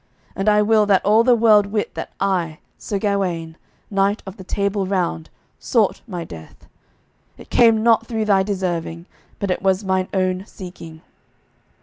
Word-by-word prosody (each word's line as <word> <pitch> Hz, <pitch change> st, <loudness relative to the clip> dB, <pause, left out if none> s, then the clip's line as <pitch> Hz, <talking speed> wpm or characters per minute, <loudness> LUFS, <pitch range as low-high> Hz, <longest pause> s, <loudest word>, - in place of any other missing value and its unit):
And 195 Hz, +2 st, +1 dB
I 210 Hz, 0 st, +4 dB
will 215 Hz, -1 st, +3 dB
that 195 Hz, -2 st, +3 dB
all 215 Hz, +3 st, +5 dB
the 245 Hz, 0 st, +5 dB
world 215 Hz, -3 st, +5 dB
wit 210 Hz, +1 st, -2 dB
that -, -, -6 dB
I, 175 Hz, -5 st, -1 dB, 0.2 s
Sir 205 Hz, -, -3 dB
Gawaine, 185 Hz, -5 st, -2 dB, 0.4 s
knight 200 Hz, +1 st, +1 dB
of 190 Hz, +1 st, -9 dB
the 190 Hz, -, -10 dB
Table 200 Hz, 0 st, -1 dB
Round, 130 Hz, -, -2 dB, 0.3 s
sought -, -, +1 dB
my 175 Hz, -2 st, -5 dB
death; 80 Hz, -, -12 dB, 0.7 s
it -, -, -15 dB
came 225 Hz, -2 st, +4 dB
not 230 Hz, -1 st, +3 dB
through 220 Hz, -3 st, -2 dB
thy 200 Hz, -2 st, +3 dB
deserving, 175 Hz, -4 st, -3 dB, 0.3 s
but 200 Hz, -2 st, -2 dB
it -, -, -2 dB
was 190 Hz, +1 st, +1 dB
mine 190 Hz, -1 st, 0 dB
own 185 Hz, -1 st, 0 dB
seeking. 170 Hz, -4 st, -11 dB
195 Hz, 160 wpm, -20 LUFS, 180-210 Hz, 0.7 s, all